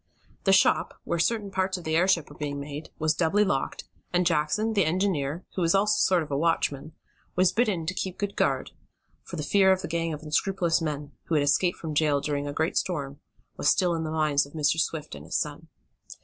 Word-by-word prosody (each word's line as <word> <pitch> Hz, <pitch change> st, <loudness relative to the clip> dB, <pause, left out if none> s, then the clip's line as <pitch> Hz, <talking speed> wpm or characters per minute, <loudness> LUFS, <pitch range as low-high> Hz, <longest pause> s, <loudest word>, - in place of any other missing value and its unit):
The -, -, +5 dB
shop, -, -, +3 dB
where 170 Hz, -, -2 dB
certain 205 Hz, +2 st, 0 dB
parts 190 Hz, 0 st, 0 dB
of 180 Hz, -, -9 dB
the 160 Hz, 0 st, -1 dB
airship 175 Hz, -2 st, +3 dB
were 145 Hz, -, -13 dB
being 145 Hz, -1 st, -4 dB
made, 145 Hz, +2 st, -7 dB
was 155 Hz, 0 st, +1 dB
doubly 180 Hz, +5 st, +2 dB
locked, 135 Hz, -8 st, -2 dB, 0.3 s
and 180 Hz, 0 st, +2 dB
Jackson, 170 Hz, +7 st, +1 dB
the 200 Hz, -3 st, +3 dB
engineer, 165 Hz, -2 st, -1 dB
who 185 Hz, -, -3 dB
was 170 Hz, +2 st, +3 dB
also 210 Hz, +2 st, +3 dB
a -, -, -1 dB
sort 180 Hz, -3 st, +3 dB
of 150 Hz, -, -10 dB
watchman, 150 Hz, 0 st, 0 dB, 0.4 s
was 185 Hz, 0 st, +4 dB
bidden 205 Hz, -8 st, 0 dB
to 180 Hz, -, -2 dB
keep 185 Hz, -1 st, -4 dB
good 200 Hz, -1 st, -3 dB
guard, 135 Hz, -1 st, 0 dB, 0.5 s
for -, -, -9 dB
the 150 Hz, -, -3 dB
fear 190 Hz, +5 st, +4 dB
of 190 Hz, 0 st, +1 dB
the -, -, -3 dB
gang 165 Hz, 0 st, -1 dB
of 150 Hz, 0 st, -6 dB
unscrupulous 170 Hz, +2 st, +1 dB
men, 150 Hz, -2 st, -3 dB
who 165 Hz, -, -1 dB
had 145 Hz, -, +3 dB
escaped 175 Hz, +5 st, +2 dB
from 160 Hz, -2 st, -5 dB
jail 150 Hz, -1 st, +2 dB
during 145 Hz, 0 st, -2 dB
a -, -, -3 dB
great 160 Hz, +3 st, -1 dB
storm, 145 Hz, -5 st, -2 dB, 0.4 s
was -, -, +2 dB
still 180 Hz, -4 st, +3 dB
in 165 Hz, -1 st, -2 dB
the 155 Hz, -, -3 dB
minds 155 Hz, -2 st, +2 dB
of 140 Hz, -, -18 dB
Mr. 160 Hz, +1 st, +1 dB
Swift 160 Hz, -1 st, -2 dB
and 70 Hz, 0 st, -9 dB
his -, -, 0 dB
son. -, -, -4 dB
165 Hz, 220 wpm, -27 LUFS, 150-185 Hz, 0.5 s, The